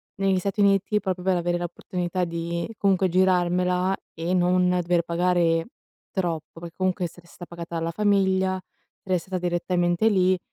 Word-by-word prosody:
negli 195 -1 +1
Stati 200 +3 -3
Uniti 200 +1 +3
proprio 185 -3 -3
per 185 -2 +3
avere 175 0 0
la 175 - -4
opportunità 180 +1 -3
di, 170 +2 -3
comunque, 190 -2 +2
girarmela 180 +1 +2 0.2
e 165 +3 -2
non 180 0 +3
dover 175 -1 +2
pagare 170 -1 +1 0.5
troppo, 165 -4 -3
perché 170 -1 -9
comunque 185 -1 0
essere 175 0 -10
sta 175 - -11
pagata 170 -1 -7
alla 165 +1 -2
famiglia, 190 -1 +2 0.4
restata 185 0 -2
direttamente 175 +3 +1
lì. 185 -2 +3
180 Hz, 150 wpm, -25 LUFS, 175-190 Hz, 0.5 s, Uniti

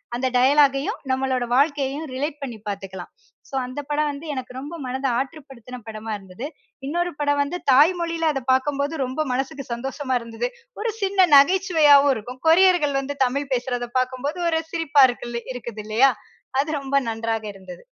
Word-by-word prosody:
அந்த 260 +2 0
டயலாகையும், 275 +2 +3
நம்மளோட 260 -1 0
வாழ்க்கையையும் 285 +2 +1
ரிலேட் 290 +3 -3
பண்ணி 250 -5 -5
பார்த்துக்கலாம். 195 -2 -6 0.4
ஸோ, - - -23
அந்த 255 +3 -6
படம் 295 0 +1
வந்து 285 +3 -7
எனக்கு 255 -1 -6
ரொம்ப 290 +6 -6
மனத 260 +2 -4
ஆற்றுப்படுத்தின 265 -4 -7
படமா 220 0 -6
இருந்தது. 195 +6 -9 0.4
இன்னொரு 345 +3 -1
படம் 290 -1 +1
வந்து 320 +5 -4
தாய்மொழியில 330 +2 +3
அத 270 - -3
பார்க்கும்போது, 280 +3 0
ரொம்ப 260 +5 -2
மனசுக்கு 270 +1 -3
சந்தோஷமா 260 +1 -2
இருந்தது. 230 - -4 0.3
ஒரு 460 - 0
சின்ன 385 -2 +3
நகைச்சுவையாவும் 290 -3 +6
இருக்கும். 250 +4 -8
கொரியர்கள் 340 -5 +4
வந்து 280 +1 -4
தமிழ் 275 +2 -2
பேசுறத 245 -1 -2
பார்க்கும்போது, 260 +6 -3
ஒரு 320 0 +1
சிரிப்பா 305 -4 +4
இருக்குல 240 -1 -5
இருக்குது 235 -3 -7
இல்லையா? 235 +5 +4 0.5
அது 305 +2 -4
ரொம்ப 275 +1 -3
நன்றாக 225 -1 -2
இருந்தது. 185 -2 -11
275 Hz, 150 wpm, -23 LUFS, 250-295 Hz, 0.5 s, நகைச்சுவையாவும்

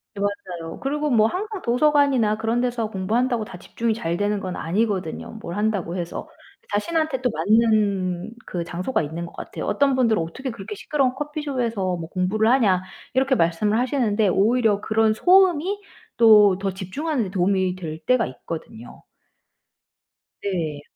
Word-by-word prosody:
네 200 - -5
맞아요. 180 -5 -4
그리고 295 +2 -1
뭐 225 -5 +4
항상 400 - -3
도서관이나 255 -4 +3
그런 225 +2 0
데서 235 -3 -1
공부한다고 225 +4 0
다 185 - -10
집중이 225 +5 -2
잘 170 -6 -2
되는 205 +2 0
건 185 -2 -5
아니거든요. 190 -1 -2
뭘 170 - -6
한다고 205 -5 -1
해서. 175 -1 -5 0.4
자신한테 310 +5 0
또 250 - +1
맞는 205 -4 +1
그 175 -2 -3
장소가 180 +9 -2
있는 160 +3 -4
것 - - -12
같아요. - - -6
어떤 275 -2 +2
분들은 230 -7 +2
"어떻게 255 +12 -5
그렇게 210 -1 -7
시끄러운 270 +3 0
커피숍에서 255 - -2
뭐 165 -1 -6
공부를 195 +5 +1
하냐?" 200 -8 +3 0.3
이렇게 265 +1 +2
말씀을 190 +3 +1
하시는데 230 -5 +1
오히려 215 +2 +2
그런 220 0 +2
소음이 370 - +4 0.4
또 210 -4 +7
더 195 0 -1
집중하는 240 - -3
데 - - -5
도움이 190 -1 +1
될 160 -4 -6
때가 255 -3 +3
있거든요. 125 -3 -9 1.4
네. 165 -7 -3
215 Hz, 350 characters per minute, -23 LUFS, 185-255 Hz, 1.4 s, 또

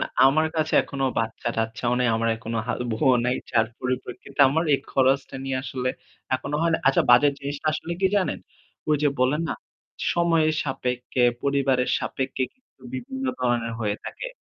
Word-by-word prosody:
না - - +1 0.2
আমার 155 +4 +3
কাছে 155 0 0
এখনো 135 -1 -3
বাচ্চা-টাচ্চাও 115 +1 -2
নাই। 125 -1 +2
আমার 115 0 0
এখনো 115 +1 -5
হা 125 - 0 0.2
বউও 130 +3 +3
নাই। 125 +1 +1
যার 115 -2 +3
পরিপ্রেক্ষিতে 130 +2 -4
আমার 160 +4 +1
এই - - +2
খরচটা 135 0 +2
নিয়ে 135 -1 -1
আসলে 130 -2 -3 0.5
এখনো 145 +3 -2
হয় 170 - +2
না? - - +1
আচ্ছা 135 - +4
বাজেট 140 +4 +6
জিনিসটা 140 +2 -5
আসলে 165 +2 -4
কি 190 - +4
জানেন? 190 -3 0 0.5
ঐ - - +2
যে 145 - +5
বললেন 140 +6 +2
না - - -1 0.6
সময়ের 165 -2 +3
সাপেক্ষে, 125 -2 -1 0.2
পরিবারের 135 -2 +1
সাপেক্ষে 130 0 -3
কিন্তু 255 - -43
বিভিন্ন 265 +1 -5 0.2
ধরনের 120 -2 0
হয়ে 105 -1 -1
থাকে। - - -6
135 Hz, 165 wpm, -25 LUFS, 125-155 Hz, 0.6 s, বাজেট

